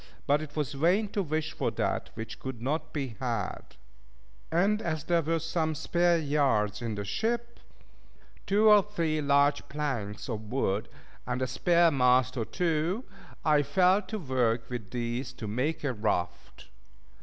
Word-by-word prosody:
But 145 +2 +3
it 150 -1 -8
was 150 -2 -2
vain 180 +9 +2
to 205 - -1
wish 155 -3 -2
for - - -1
that - - -2
which 110 0 -7
could 130 -3 -6
not 140 +7 -2
be 135 -7 -4
had; 115 -7 -3 0.8
and 200 +6 +2
as 160 -5 -2
there 170 +1 +2
were 165 +2 0
some 160 -1 -1
spare 175 +3 +2
yards 140 -9 +1
in 115 -2 -3
the 100 0 -4
ship, 235 - -2 0.9
two 210 +3 +4
or 210 -1 +8
three 165 -6 -1
large 140 0 +2
planks 130 -9 -3
of 110 -3 -5
wood, 110 -4 0 0.4
and 125 0 -1
a 130 - +1
spare 170 +6 +3
mast 125 -1 +3
or 115 -3 -1
two, 170 - 0 0.4
I 150 -2 +5
fell 180 +7 +3
to 210 +2 -5
work 125 - 0
with 115 -5 -5
these, 120 +1 -3
to 110 - -7
make 130 +10 -1
a 140 -3 0
raft. 90 -5 -3
145 Hz, 160 wpm, -29 LUFS, 120-170 Hz, 0.9 s, or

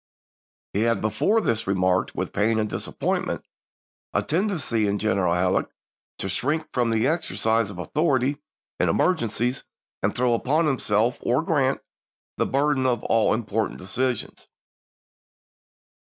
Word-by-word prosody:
He 100 - 0
had 115 0 +2
before 200 - +2
this 115 - -1
remarked, 95 -1 +1
with - - -3
pain 110 +2 +2
and 110 -1 +1
disappointment, - - -2 0.7
a - - +2
tendency 155 - 0
in 100 0 0
General 95 -5 +1
Halleck 90 +1 +1 0.5
to - - -4
shrink 150 - -1
from 120 -2 +1
the 115 +1 +2
exercise 115 - +1
of 100 - -9
authority 140 - +1 0.4
in - - +2
emer 185 - +3
gencies, 120 - -2 0.4
and - - +2
to - - -12
throw 125 -1 +3
upon 150 +8 +2
himself 120 -4 +1
or 130 +6 +1
Grant 140 -5 +1 0.6
the - - +1
burden 140 -1 +2
of 120 -3 0
all 115 -1 +3
important 110 -2 -2
decisions. 125 +7 -3
120 Hz, 140 wpm, -24 LUFS, 105-140 Hz, 0.7 s, emer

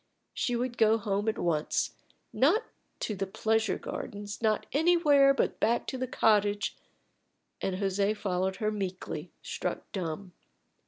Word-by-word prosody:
She 245 - 0
would 240 0 -2
go 220 0 +5
home 205 0 0
at 220 - -2
once; 160 -3 0 0.4
not 350 - +4 0.4
to 215 - -2
the 195 0 -2
pleasure 220 +3 +1
gardens, 205 +1 -6
not 215 -2 +1
anywhere 295 -3 +5
but 275 - 0
back 235 +2 +2
to 260 - -4
the 255 - -1
cottage; 205 -3 +2 0.9
and 190 - -1
José 200 +2 0
followed 190 -1 -1
her 215 +1 -1
meekly, 190 -3 -4
struck - - -4
dumb. 180 -1 -4
210 Hz, 140 wpm, -30 LUFS, 195-240 Hz, 0.9 s, go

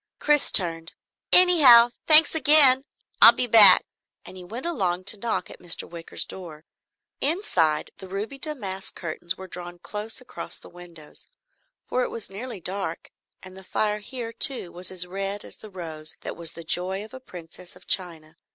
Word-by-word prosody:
Chris 295 -1 +1
turned. 165 -3 -1 0.4
"Anyhow, 275 -10 +6 0.2
thanks 315 +1 +7
again. 285 -3 +9 0.4
I'll - - +7
be 250 - -3
back," 215 -5 +7 0.4
and - - -13
he 185 - -12
went 230 - -10
along 185 - -4
to 210 +3 +1
knock 230 +3 -5
at - - -15
Mr. 175 -2 -2
Wicker's 170 -1 -6
door. 160 -4 -12 0.5
Inside, 185 - -3
the 190 - -11
ruby 210 +8 -8
damask 205 -11 -5
curtains 170 +1 -5
were 190 - -12
drawn 175 -1 -10
close 210 +6 -7
across 255 - -9
the - - -16
windows, 170 -3 -14 0.6
for 255 - -4
it - - -4
was 225 -4 -8
nearly 225 +2 -9
dark, 195 +3 -8 0.3
and 185 0 -14
the 190 - -14
fire 210 +2 -4
here 230 +2 -9
too 250 - -1
was 180 +1 -5
as 180 -1 -2
red 195 +2 -6
as - - -11
the 215 - -14
rose 160 -5 -8
that - - -9
was 165 -1 -6
the 170 - -11
joy 185 +5 -3
of 220 - -19
a 260 - -11
princess 180 -6 -14
of 180 - -20
China. 165 -4 -3
190 Hz, 175 wpm, -22 LUFS, 175-245 Hz, 0.6 s, again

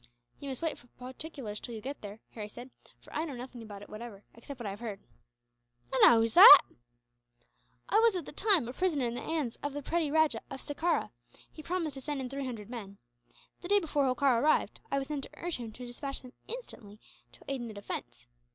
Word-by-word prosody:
"You 280 - -6
must 265 +3 -6
wait 325 - -1
for 240 - -20
particulars 255 -4 -6
until 235 - -6
you 220 - -7
get 275 +5 -6
there," 205 +1 -9
Harry 210 -2 -6
said, 245 +4 -10 0.3
"for - - -16
I 310 - 0
know 295 -5 -5
nothing 245 0 -8
about 205 -2 -9
it - - -12
whatever, 215 -2 -9
except 250 +3 -10
what 240 - -6
I 200 - -2
have 200 - -8
heard." 215 -4 -5 0.9
"And 265 - +4
how 230 -1 +8
is 225 -1 0
that?" 390 0 +12 1.3
"I 425 - +4
was, 455 -3 +4
at 350 -5 -3
the - - -8
time, 380 - +4
a 245 - -5
prisoner 310 -6 0
in 235 - -2
the 245 - -5
hands 300 -8 -2
of 290 -1 -3
the 290 0 -5
petty 330 0 0
Rajah 315 +1 +2
of 270 - -7
Sekerah. 320 +6 -1 0.4
He 310 - -10
promised 335 -2 -2
to 270 - -8
send 290 +1 -3
in 255 -1 -5
three 275 -1 -3
hundred 220 -5 -6
men. 205 -5 -8 0.6
The 350 - -6
day 410 +2 +5
before 300 -5 0
Holkar 255 -1 +3
arrived, 305 +3 +2
I 275 - 0
was 270 -1 -2
sent 290 -3 -2
to - - -13
urge 345 -1 -2
him 235 -3 -7
to 250 - -9
despatch 275 +3 -6
them 250 0 -12
instantly 225 - -9 0.3
to - - -18
aid 275 -2 -2
in 240 - -5
the 220 - -8
defence. - - -7
265 Hz, 230 wpm, -31 LUFS, 230-310 Hz, 1.3 s, that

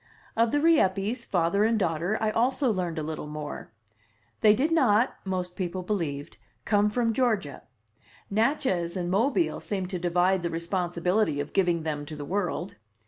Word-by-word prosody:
Of 230 +1 +3
the 290 - +1
Rieppes, 235 - +2
father 180 +3 +1
and 225 +1 +2
daughter, 175 +2 0
I 220 -1 +1
also 250 +3 +1
learned 180 -4 -2
a 155 - -2
little 155 -1 -5
more. 150 -4 -7 0.7
They 210 -1 +6
did 295 +8 0
not 250 -7 +3
(most 180 -2 -3
people 185 0 -3
believed) 165 -7 -3 0.3
come 210 0 +3
from 230 +1 0
Georgia. 220 - 0 0.7
Natchez 205 - 0
and 175 -1 -2
Mobile 260 - +1
seemed 190 -2 -4
to 180 - -2
divide 180 +2 +2
the 170 - -2
responsibility 175 0 0
of 145 - -4
giving 175 -4 +2
them 150 -2 -3
to 155 - -7
the 145 -1 -6
world. 180 0 -2
190 Hz, 160 wpm, -27 LUFS, 170-220 Hz, 0.7 s, They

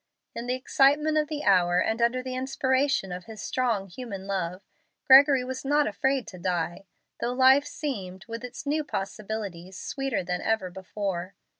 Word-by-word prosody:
In 235 +1 -6
the 250 - +1
excitement 290 +4 +3
of 300 - 0
the 295 -1 -4
hour, 180 -3 +4
and 220 +5 0
under 245 +2 +2
the 255 0 -5
inspiration 260 -4 0
of 180 0 -6
his 220 -1 -10
strong 230 -6 -1
human 195 -1 -7
love, 185 -1 -3 0.4
Gregory 270 0 +7
was 260 +1 -5
not 290 +2 +3
afraid 265 +5 0
to 185 - -11
die, 175 +1 -2 0.3
though 240 +1 -1
life 265 +2 +5
seemed, 195 - -5
with 230 +1 -6
its 250 +3 -8
new 300 +2 0
possibilities, 195 - -5
sweeter 270 -7 -2
than 180 0 -3
ever 220 -5 0
before. 190 -1 -4
230 Hz, 165 wpm, -27 LUFS, 190-265 Hz, 0.4 s, Gregory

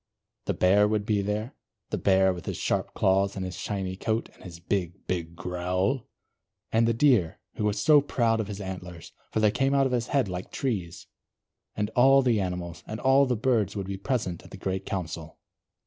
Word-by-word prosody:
The - - -1
Bear 100 +3 +4
would 105 -1 0
be 105 -3 +1
there, 105 +4 -3 0.4
the - - 0
Bear, 95 -1 +4
with 90 - -9
his - - -3
sharp - - -1
claws, 95 +1 +2
and 95 -1 -3
his 90 - -5
shiny 95 -3 -3
coat, 110 +3 -2
and - - -21
his 85 -2 -9
big, 90 0 -3
big 85 -2 -3
growl; 90 +7 -1 0.6
and 115 +1 +3
the 115 - +3
Deer, 115 - +3 0.2
who 105 - -1
was 105 -1 0
so 150 +4 +6
proud 115 -5 +1
of 110 - -2
his 100 -1 -6
antlers, 90 -3 -7 0.2
for - - 0
they 105 -1 +4
came 135 +4 +1
out 135 -1 +4
of 135 - 0
his 120 -2 0
head 135 -6 +1
like 90 0 -6
trees; 90 -10 -3 0.7
and 105 +1 -2
all 135 +3 +5
the 115 -5 +2
animals, 90 -2 -4
and 110 - -5
all 135 +1 +4
the 125 - +1
birds 110 -5 +1
would 100 -2 -3
be 100 +1 -4
present 100 - -2
at - - -14
the - - -10
great 95 0 -3
Council. 80 -4 -5
100 Hz, 205 wpm, -27 LUFS, 90-115 Hz, 0.7 s, so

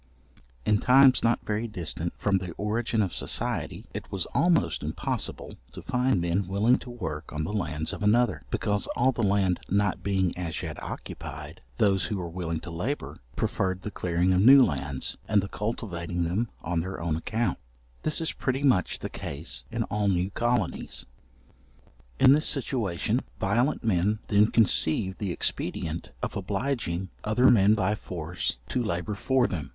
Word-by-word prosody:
In 105 - +3
times 130 0 +6
not 115 0 +1
very 110 +2 -1
distant 90 -7 -4
from 100 -1 +2
the 90 -2 -6
origin 110 +3 0
of 95 - -3
society, - - -1
it - - -7
was 95 -3 -2
almost 165 +2 +2
impossible - - -4 0.2
to - - -9
find 125 -4 +1
men 85 +2 0
willing 105 +6 +3
to - - -10
work 80 -11 -5
on 75 0 -3
the 100 - -3
lands 80 -6 -2
of - - -7
another, 105 - +3
because 105 -1 0
all 130 +2 +3
the 120 - -3
land 100 -3 +2
not 100 0 +1
being 95 -3 0
as 85 -3 -4
yet - - -6
occupied, - - -7 0.2
those 95 -2 +3
who 105 - -2
were 85 -2 -5
willing 85 -2 -3
to 85 - -7
labour, 110 - -4 0.2
preferred 95 0 -1
the 105 - -4
clearing 90 0 +1
of 90 - +3
new 135 +5 +9
lands, 70 - -2
and 105 -2 +4
the - - -3
cultivating 90 -6 -3
them 100 +8 -1
on 85 +1 -1
their 95 +3 -4
own 85 -2 -1
account; 115 +6 -1 0.4
this 155 - +1
is 165 - +1
pretty 130 +1 -2
much 125 -10 +3
the - - -5
case 75 +4 -5
in - - -1
all 105 0 -1
new 95 0 +1
colonies. 120 +3 -1 1.1
In 130 - +8
this 150 +3 +4
situation 115 - 0 0.2
violent 125 +5 +1
men 105 0 +2
then 105 +1 +5
conceived 95 -3 +2
the 100 -4 -2
expedient 80 -1 -2
of - - -2
obliging 100 -3 -2
other 115 +4 +4
men 105 -1 +5
by 100 -1 +1
force 85 - -3
to 125 - 0
labour 90 +1 -2
for 130 +5 +2
them. 75 - -3
100 Hz, 165 wpm, -27 LUFS, 90-115 Hz, 1.1 s, new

